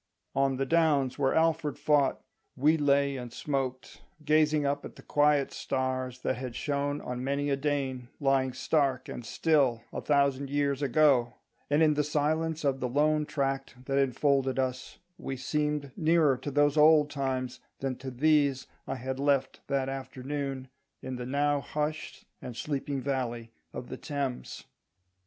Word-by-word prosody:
On 135 -1 +1
the 135 - 0
downs 145 -4 +2
where 135 -2 +2
Alfred 160 -2 +1
fought 145 -3 +2 0.3
we 150 +5 +4
lay 140 -2 +2
and 125 -2 -7
smoked, 130 -1 -4 0.2
gazing 155 -1 +3
up 140 +1 -1
at - - -9
the - - -14
quiet 145 -1 +2
stars 130 -1 -2
that - - -1
had 125 -2 -6
shone 145 0 -1
on 125 0 -5
many 140 +1 -1
a - - +3
Dane 135 -3 -2
lying 135 -2 +2
stark 135 -4 0
and 120 - -6
still 135 -4 +1
a - - -3
thousand 140 -1 +1
years 140 -1 0
ago; 135 -3 +3 0.3
and 145 +3 +4
in 155 -1 +5
the 150 0 +1
silence 155 +2 0
of 135 -2 +1
the 125 - -2
lone 150 +3 +2
tract 135 -3 -3
that 135 0 +1
enfolded 135 0 +1
us 130 -1 -2 0.2
we 135 - -4
seemed 150 0 -1
nearer 155 -4 +3
to 135 - -6
those 145 +1 +2
old 150 -1 +6
times 130 -2 -2 0.2
than 135 -1 -2
to 135 - -6
these 140 0 +2 0.2
I 135 - -2
had 130 +1 -4
left 140 -2 +1
that 135 -1 0
afternoon, 135 0 -5 0.3
in 130 -1 -4
the 125 0 -5
now 145 +2 +1
hushed 150 +1 -4 0.2
and 120 -2 -7
sleeping 140 0 -3
valley 120 -4 -3 0.2
of 125 - -7
the - - -6
Thames. 140 -4 -4
140 Hz, 160 wpm, -29 LUFS, 130-150 Hz, 0.3 s, old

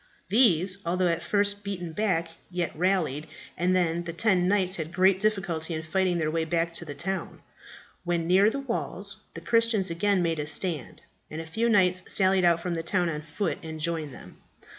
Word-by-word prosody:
These, 190 -4 +4
although 180 +1 +1
at 165 0 0
first 205 0 +1
beaten 180 -4 -5
back, 170 -5 0 0.2
yet 180 -2 -3
rallied, 165 -4 0 0.3
and 180 +1 +1
the 170 -1 0
ten 180 -1 +2
knights 190 -1 +1
had 160 -1 -5
great 190 +1 +3
difficulty 190 -6 -1
in 160 - -4
fighting 180 +2 0
their 155 -2 0
way 165 0 0
back 165 +1 -1
to 170 - -4
the 145 -2 -7
town. 190 +2 -4 0.6
When 170 -1 -1
near 190 +4 +5
the 275 +5 -4
walls 255 -4 -4 0.2
the - - -7
Christians 230 -5 +1
again 190 +2 +1
made 165 -2 0
a 150 - -3
stand, 160 -3 0 0.3
and 155 - -6
a 165 - -5
few 225 +9 0
knights 185 -4 +3
sallied 190 -1 +3
out 170 -1 +3
from 175 0 -2
the 165 - -2
town 175 +1 0
on 150 -2 -4
foot 165 +5 -3
and 160 -1 -7
joined 160 -2 -2
them. - - -13
175 Hz, 190 wpm, -27 LUFS, 165-195 Hz, 0.6 s, near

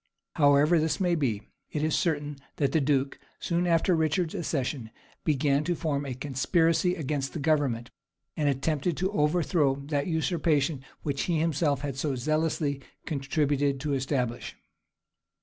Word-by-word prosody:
However 145 +3 +5
this 155 -1 0
may 180 -2 +2
be, 125 -11 0 0.3
it 150 - -2
is 155 -1 +1
certain 150 -4 -1 0.2
that 140 -3 +1
the 160 - +2
duke, 135 -1 0 0.2
soon 175 +1 0
after 170 +1 +3
Richard's 160 +1 0
accession, 140 - -2 0.3
began 145 -1 +2
to 175 +1 0
form 145 -4 -2
a 130 - -4
conspiracy 165 +6 +1
against 140 -3 -2
the 165 - -4
government, 140 -6 0 0.4
and 150 -2 +1
attempted 145 +4 0
to 190 +2 0
overthrow 150 -4 +2
that 140 +1 -2
usurpation 160 -4 +1 0.2
which 140 -2 -1
he 170 -2 +1
himself 150 -3 +1
had 140 -2 -4
so 140 0 -1
zealously 155 +1 0 0.2
contributed 140 -1 0
to 150 -1 -1
establish. 130 -3 -2
150 Hz, 145 wpm, -28 LUFS, 140-160 Hz, 0.4 s, However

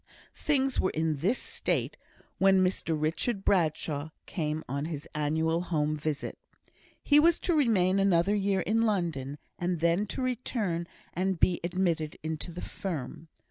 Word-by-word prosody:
Things 270 -3 +1
were 185 - +2
in 160 -1 0
this 195 - +1
state - - -1 0.4
when 190 -1 +5
Mr 165 -4 0
Richard 195 +7 -1
Bradshaw 155 -4 +1 0.2
came 155 -2 -2
on 140 +3 -2
his 155 -3 -5
annual 160 +2 +1
home 155 -4 0
visit. 150 -1 -3 0.6
He 290 0 +6
was 335 +2 +5
to 355 - +1
remain 200 - +3
another 195 0 +3
year 195 -2 +1
in 220 +5 +1
London, 170 - -1 0.2
and 175 -1 -1
then 170 +5 +2
to 255 - -3
return 220 -9 -1 0.3
and 185 0 0
be 175 - +3
admitted 170 -3 0
into 160 +2 -4
the 175 - -7
firm. 160 -4 -5
175 Hz, 145 wpm, -29 LUFS, 155-195 Hz, 0.6 s, He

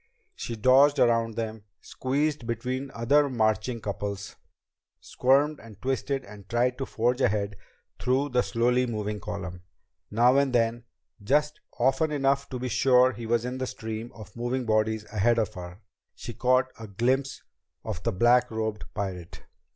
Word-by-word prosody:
She 115 - -5
dodged 130 +6 +5
around 115 -2 +2
them, 110 -2 -4 0.2
squeezed 140 -1 -2
between 125 +4 -3
other 140 +5 +3
marching 110 0 0
couples, 100 -1 -5 0.6
squirmed 140 +3 +2
and 110 -3 -14
twisted 135 +1 -2
and 100 -1 -13
tried 125 +2 +1
to 135 - -3
forge 125 +3 0
ahead 100 -1 +1 0.4
through 130 +3 +1
the 125 -1 +2
slowly 125 +1 +1
moving 105 -2 -3
column. 90 -4 -6 0.5
Now 120 +5 +4
and 140 -2 +2
then, 120 0 +1 0.4
just 150 +6 +1 0.2
often 135 +5 +2
enough 140 -1 +1
to 130 - -4
be 125 +1 -3
sure 125 +1 +4
he 120 -2 -7
was 120 0 +1
in 125 +1 -4
the 130 - -2
stream 110 0 -6
of 105 -2 -12
moving 120 +2 -2
bodies 110 -1 +1
ahead 115 +3 +3
of 110 -4 0
her, 90 +2 -9 0.3
she 120 - -7
caught 130 +3 +2
a 115 - -7
swift 100 -2 -16
glimpse 130 +3 0 0.4
of - - -5
the - - 0
black 120 +5 +4
robed 110 -1 -3
pirate. 95 -4 -5
120 Hz, 160 wpm, -27 LUFS, 110-130 Hz, 0.6 s, dodged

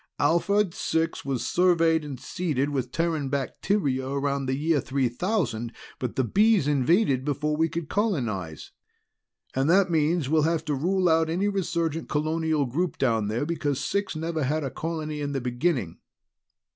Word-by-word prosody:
"Alphard 170 +5 +2
Six 165 -1 -1
was 135 -3 -2
surveyed 165 -3 +3
and 140 -4 -7
seeded 145 -6 -2
with 130 -3 -2
Terran 160 -2 -1
bacteria 140 0 -1
around 140 -1 -1
the 130 - 0
year 155 -1 +1
3000, 130 - -1 0.3
but 125 -3 -3
the 130 - +2
Bees 205 - +3
invaded 145 - +2
before 150 +1 -1
we 160 +1 +1
could 160 0 -4
colonize. 120 - -2 0.8
And 135 +3 +1
that 190 +1 +4
means 160 -1 +2
we'll 155 +2 +3
have 160 +1 0
to 150 - -1
rule 180 +6 +1
out 160 -1 +3
any 180 +5 0
resurgent 170 -5 -2
colonial 155 0 0
group 160 +8 -2
down 115 -5 +1
there, 115 +7 -1
because 145 -4 -1
Six 200 -3 -1
never 160 0 -2
had 155 +3 0
a 135 - -3
colony 155 -2 -4
in 145 0 -2
the 135 - 0
beginning." 125 - -1
155 Hz, 160 wpm, -26 LUFS, 135-170 Hz, 0.8 s, that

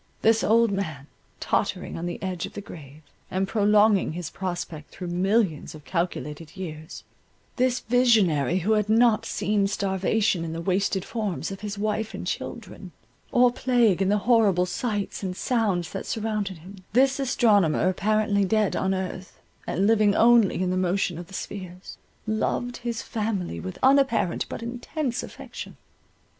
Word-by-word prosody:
This 225 0 +4
old 230 +1 +4
man, 160 -8 -3 0.3
tottering - - -1
on 170 +1 -4
the 175 - -5
edge 185 -3 -3
of - - -15
the - - -6
grave, 155 -5 -12 0.3
and 190 +1 -1
prolonging 210 -3 +3
his 170 -1 -5
prospect 175 -5 -5
through 180 -2 -7
millions 185 -3 0
of 150 - -13
calculated 165 -2 -4
years,—this 190 +9 -5
visionary 210 - +3
who 220 - +2
had 210 -1 +2
not 225 0 +4
seen 205 -1 0
starvation 195 -1 0
in 165 -1 -4
the 165 - -4
wasted 190 +1 0
forms 200 - -3
of 195 - -7
his 205 -1 -5
wife 215 +1 -2
and - - -6
children, - - -6 0.4
or 245 0 +5
plague 240 -6 +2
in 190 - +2
the 205 - +3
horrible 210 -7 +4
sights 205 +2 -3
and 185 -2 -4
sounds 200 -9 0
that 195 - -5
surrounded 210 -4 -2
him—this 200 - 0
astronomer, 210 - +3
apparently 205 +2 +1
dead 210 0 +1
on 190 0 0
earth, 185 -1 -6 0.3
and 190 - 0
living 215 -2 +4
only 230 -5 +5
in 180 - 0
the 185 - 0
motion 185 -2 0
of 175 - -8
the 195 - -10
spheres—loved 205 +6 -5
his 235 -1 -4
family 210 - -3
with 95 +3 -6
unapparent 265 -9 +3
but - - -6
intense 245 +2 -3
affection. - - -9
200 Hz, 150 wpm, -25 LUFS, 180-225 Hz, 0.4 s, or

